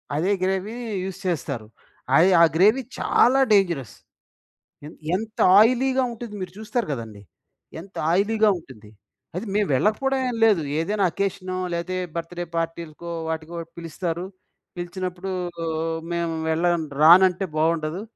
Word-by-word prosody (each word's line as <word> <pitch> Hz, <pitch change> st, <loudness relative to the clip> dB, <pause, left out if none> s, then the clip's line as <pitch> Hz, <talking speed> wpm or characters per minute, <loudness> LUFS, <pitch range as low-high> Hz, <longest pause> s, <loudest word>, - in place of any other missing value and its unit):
అదే 170 Hz, +7 st, +1 dB
gravy, 190 Hz, +4 st, -1 dB, 0.3 s
use 190 Hz, 0 st, -6 dB
చేస్తారు. 140 Hz, -9 st, -3 dB, 0.5 s
అయ్ 180 Hz, +6 st, +6 dB
ఆ -, -, +9 dB
గ్రేవీ 210 Hz, +9 st, +5 dB, 0.2 s
చాలా 260 Hz, +3 st, +4 dB
డేంజరస్. 170 Hz, -, +1 dB, 0.9 s
ఎన్ 155 Hz, -, -10 dB, 0.2 s
ఎంత 220 Hz, +2 st, -5 dB, 0.2 s
ఆయిలీగా 255 Hz, +3 st, +3 dB
ఉంటది 230 Hz, -2 st, -8 dB
మీరు 185 Hz, -, -5 dB
చూస్తారు 220 Hz, 0 st, -2 dB
కదండీ! 115 Hz, -6 st, -6 dB, 0.6 s
ఎంత 190 Hz, +4 st, -13 dB, 0.2 s
ఆయిలీగా 215 Hz, +3 st, +3 dB
ఉంటుంది. 110 Hz, -8 st, -15 dB, 0.5 s
అది 190 Hz, -, -3 dB
మేము 210 Hz, -1 st, +2 dB
వెళ్ళకపోవడం 265 Hz, -, +1 dB
ఏమి 235 Hz, -2 st, -4 dB
లేదు. 205 Hz, -7 st, +4 dB, 0.2 s
ఏదైనా 200 Hz, +5 st, 0 dB
అకేషనో, 185 Hz, -2 st, -3 dB, 0.2 s
లేకపోతే 170 Hz, +2 st, -3 dB
ఏ -, -, -3 dB
బర్త్ 170 Hz, +1 st, -5 dB
డే 175 Hz, -, -2 dB
పార్టీలకో 165 Hz, 0 st, -4 dB, 0.2 s
వాటికో 160 Hz, +1 st, -4 dB, 0.2 s
పిలుస్తారు. 170 Hz, +1 st, -4 dB, 0.5 s
పిలిచినప్పుడు, 180 Hz, +1 st, -5 dB, 0.8 s
మేము 170 Hz, -1 st, -1 dB, 0.2 s
వెళ్ళం 170 Hz, +1 st, +1 dB, 0.2 s
రానంటే 180 Hz, +4 st, +6 dB
బాగుండదు. 160 Hz, +2 st, 0 dB
180 Hz, 125 wpm, -23 LUFS, 165-210 Hz, 0.9 s, ఆ